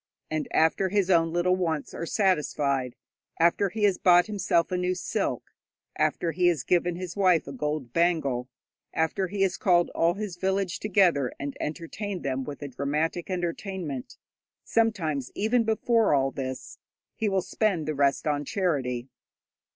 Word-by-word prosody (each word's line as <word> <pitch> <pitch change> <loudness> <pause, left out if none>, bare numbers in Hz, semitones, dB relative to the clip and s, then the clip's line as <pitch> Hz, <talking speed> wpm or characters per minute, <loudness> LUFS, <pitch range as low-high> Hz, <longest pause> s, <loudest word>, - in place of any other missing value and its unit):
And 155 -1 -1
after 160 +4 +2
his 195 -1 +1
own 165 -2 +3
little 175 +2 +2
wants 165 -5 -2
are 170 - -5
satisfied, 145 - 0 0.4
after 170 +4 +3
he 215 +3 -4
has 195 -3 +3
bought 175 -1 +6
himself 195 -5 0
a - - 0
new 180 0 0
silk, 180 - -3 0.4
after 170 - 0
he 175 +3 +2
has 165 -8 +1
given 175 +1 +1
his 180 0 -6
wife 185 -5 +3
a 140 - -7
gold 145 -2 -3
bangle, 140 -8 +1 0.5
after 160 +4 0
he 195 +1 -1
has 190 -2 0
called 175 -6 +3
all 170 +1 +2
his 200 -4 -5
village 190 -1 -1
together 180 - +2
and 140 0 -4
entertained 180 +5 -5
them 135 -1 -1
with 145 +1 -7
a - - -4
dramatic 150 +6 -2
entertainment 175 - -4 0.5
sometimes 165 - 0
even 225 +3 +2
before 225 -4 +2
all 135 -1 +1
this 130 -2 -6 0.4
he 220 - 0
will 190 -2 +1
spend 190 -9 0
the 155 - 0
rest 140 -1 +1
on 145 -1 0
charity. 135 -9 -1
175 Hz, 160 wpm, -27 LUFS, 145-190 Hz, 0.5 s, bought